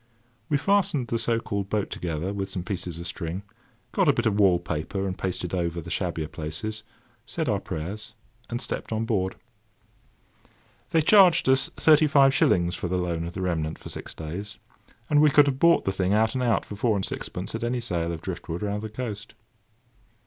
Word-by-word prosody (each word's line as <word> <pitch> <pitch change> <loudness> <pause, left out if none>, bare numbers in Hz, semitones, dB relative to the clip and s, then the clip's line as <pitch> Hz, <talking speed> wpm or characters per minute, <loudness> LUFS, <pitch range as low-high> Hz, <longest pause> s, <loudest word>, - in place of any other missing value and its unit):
We 145 - +3
fastened 155 - +1
the 115 - 0
so 115 0 +1
called 100 -4 -3
boat 105 -2 -1
together 85 +2 -3
with 100 -1 -3
some 90 - -4
pieces 90 -3 -4
of 85 - -6
string, 85 +2 -4 0.5
got - - +2
a - - +6
bit 120 - -1
of 105 -2 +2
wall 95 -3 +5
paper 85 +3 -3
and 95 -1 -2
pasted 90 -2 -3
over 85 -2 -1
the 80 - -8
shabbier 80 -1 -2
places, 85 +9 -5 0.5
said 160 -3 -3
our 100 -4 +1
prayers, 100 +7 -6 0.3
and 120 - -2
stepped - - -4
on 110 0 0
board. 95 -5 0 1.5
They 165 -2 +3
charged 180 -3 +6
us 130 0 +4
thirty 155 -1 +6
five 135 -2 +5
shillings 85 -8 +3
for 90 - -3
the 90 +1 -1
loan 85 -2 -1
of 85 - -6
the 95 - -3
remnant 80 -4 -1
for - - -10
six - - -8
days; 90 +6 -6 0.5
and 150 -1 +4
we 150 - +6
could 145 +1 +6
have 135 -2 -1
bought 170 +2 +5
the 95 - +1
thing 95 0 0
out 110 +1 +3
and 130 - -1
out 115 -5 +2
for 105 - -7
four 110 +1 +1
and 95 - 0
sixpence - - -5
at - - -3
any 120 +1 0
sale 85 -8 -2
of 80 -1 -5
drift 85 -2 -6
wood 85 +4 -3
round 105 0 -2
the 110 - -5
coast. 105 -2 -6
100 Hz, 205 wpm, -26 LUFS, 90-120 Hz, 1.5 s, a